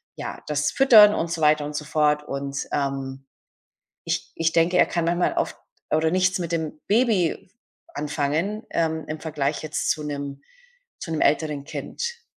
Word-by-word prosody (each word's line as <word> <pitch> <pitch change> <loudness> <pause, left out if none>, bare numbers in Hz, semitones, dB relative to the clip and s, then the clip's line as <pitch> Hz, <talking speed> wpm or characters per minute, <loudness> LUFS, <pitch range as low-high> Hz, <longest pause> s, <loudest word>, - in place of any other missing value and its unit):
ja, - - -6
das 150 0 0
Füttern 215 -6 +7
und 165 0 -2
so 165 - -3
weiter 150 -1 +4
und 150 0 -6
so 150 - -3
fort,“ 150 -1 +2
und, 140 0 -4
ähm, 135 -1 -3 0.8
ich - - -2
ich 165 0 0
denke, 170 +2 +3
er - - +6
kann 170 -1 -1
manchmal 175 +1 +1
oft - - -1 0.3
oder 160 +1 +2
nichts 185 +1 +2
mit 170 -2 -3
dem 160 -2 -3
Baby 205 -6 +1 0.4
anfangen, 155 +8 -1
ähm, 160 -2 -1
im 155 0 -5
Vergleich 150 -3 -2
jetzt 155 - -1
zu 155 - -3
'nem 140 -1 -5 0.6
zu 165 - -6
'nem 160 - -1
älteren 150 -2 +1
Kind. 470 - -5
155 Hz, 165 wpm, -24 LUFS, 150-175 Hz, 0.8 s, Füttern